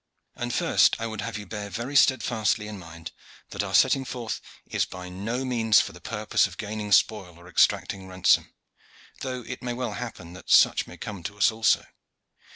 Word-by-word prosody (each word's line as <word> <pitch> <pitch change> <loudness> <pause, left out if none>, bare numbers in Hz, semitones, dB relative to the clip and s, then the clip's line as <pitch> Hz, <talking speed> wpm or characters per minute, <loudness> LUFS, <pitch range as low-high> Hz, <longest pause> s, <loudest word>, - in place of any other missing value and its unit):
And 120 0 -3
first - - +3
I 115 - -3
would 110 -2 -4
have 115 0 -4
you 105 - -8
bear 105 -1 -6
very 120 +7 -5
steadfastly 110 -6 +3
in 105 -2 -7
mind 85 -2 -10 0.4
that 100 - -2
our 100 -1 -2
setting 135 - +4
forth 120 -3 -5 0.2
is - - 0
by 90 0 -7
no 110 +8 -3
means 115 -4 +4
for - - -1
the - - -14
purpose 110 -3 +1
of 90 -1 -13
gaining 105 -1 -5
spoil 100 -5 +2
or 85 +1 -15
exacting 95 +2 +1
ransom, 95 -1 +2 0.7
though 130 -1 -4
it 130 - -7
may 125 -1 -3
well 120 -3 -3
happen 100 -7 -7
that 95 - -12
such - - +5
may - - -11
come 100 -3 -7
to 105 +5 -7
us 90 -1 +4
also. 110 0 +2
105 Hz, 190 wpm, -26 LUFS, 95-120 Hz, 0.7 s, such